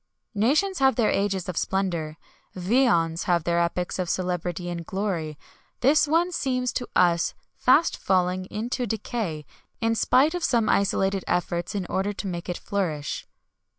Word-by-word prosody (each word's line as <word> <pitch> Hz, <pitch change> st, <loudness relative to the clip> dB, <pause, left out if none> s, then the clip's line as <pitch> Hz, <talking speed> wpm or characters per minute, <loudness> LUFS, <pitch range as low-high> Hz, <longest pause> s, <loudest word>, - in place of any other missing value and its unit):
Nations 305 Hz, -, +2 dB
have 265 Hz, -1 st, +4 dB
their 230 Hz, -4 st, +2 dB
ages 195 Hz, -2 st, 0 dB
of 180 Hz, -, -4 dB
splendour 170 Hz, -5 st, -1 dB, 0.4 s
viands 180 Hz, -5 st, +2 dB
have 175 Hz, -3 st, +2 dB
their 170 Hz, +1 st, +1 dB
epochs 175 Hz, +2 st, -1 dB
of 180 Hz, -2 st, -1 dB
celebrity 180 Hz, -1 st, -2 dB
and 170 Hz, -1 st, -4 dB
glory. 175 Hz, -5 st, -3 dB, 0.4 s
This 295 Hz, +4 st, +4 dB
one 335 Hz, +4 st, +2 dB
seems 255 Hz, -6 st, -1 dB
to 245 Hz, -, -3 dB
us 170 Hz, -2 st, +3 dB, 0.2 s
fast 295 Hz, +6 st, +3 dB
falling 185 Hz, 0 st, +1 dB
into 240 Hz, +5 st, -3 dB
decay, 210 Hz, -7 st, -3 dB, 0.3 s
in 225 Hz, 0 st, +1 dB
spite 270 Hz, +7 st, +3 dB
of 355 Hz, -1 st, -3 dB
some 230 Hz, -7 st, +2 dB
isolated 195 Hz, -1 st, +1 dB
efforts 175 Hz, +1 st, -1 dB
in 195 Hz, -3 st, -2 dB
order 195 Hz, +3 st, -1 dB
to 205 Hz, -, -6 dB
make 175 Hz, -1 st, -4 dB
it 175 Hz, -, -2 dB
reflourish. 160 Hz, -8 st, -2 dB
190 Hz, 150 wpm, -25 LUFS, 175-240 Hz, 0.4 s, have